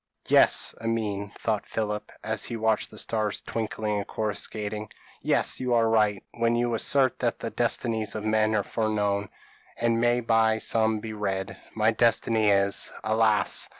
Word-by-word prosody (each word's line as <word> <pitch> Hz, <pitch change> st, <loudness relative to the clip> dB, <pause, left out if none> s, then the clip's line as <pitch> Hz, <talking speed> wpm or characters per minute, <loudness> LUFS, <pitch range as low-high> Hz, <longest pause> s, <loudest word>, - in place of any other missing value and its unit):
p> -, -, -4 dB
"Yes, -, -, +5 dB
Amine," 105 Hz, -3 st, -2 dB
thought 110 Hz, -3 st, -2 dB
Philip, 105 Hz, -1 st, -3 dB
as -, -, -1 dB
he 115 Hz, -, -4 dB
watched 110 Hz, -1 st, 0 dB
the -, -, -13 dB
stars 110 Hz, -2 st, -2 dB
twinkling 110 Hz, -2 st, -3 dB
and 100 Hz, -, -4 dB
coruscating; 105 Hz, 0 st, -3 dB, 0.3 s
"yes, -, -, +2 dB
you 125 Hz, -1 st, 0 dB
are 115 Hz, -1 st, +3 dB
right, 105 Hz, -3 st, +2 dB, 0.2 s
when 115 Hz, 0 st, +2 dB
you 120 Hz, 0 st, 0 dB
assert 130 Hz, +2 st, +2 dB
that -, -, 0 dB
the -, -, -5 dB
destinies 110 Hz, -3 st, -1 dB
of 110 Hz, -, -4 dB
men 110 Hz, 0 st, +2 dB
are 105 Hz, -, +1 dB
foreknown, 105 Hz, -2 st, -1 dB, 0.5 s
and 115 Hz, 0 st, +1 dB
may 120 Hz, 0 st, +3 dB
by 115 Hz, -1 st, +2 dB
some 110 Hz, -1 st, +1 dB
be 110 Hz, 0 st, -6 dB
read. 100 Hz, -2 st, -3 dB, 0.2 s
My 110 Hz, 0 st, +3 dB
destiny 115 Hz, -1 st, +2 dB
is, 100 Hz, 0 st, +1 dB
alas! 110 Hz, -1 st, +2 dB
110 Hz, 160 wpm, -26 LUFS, 105-115 Hz, 0.5 s, Yes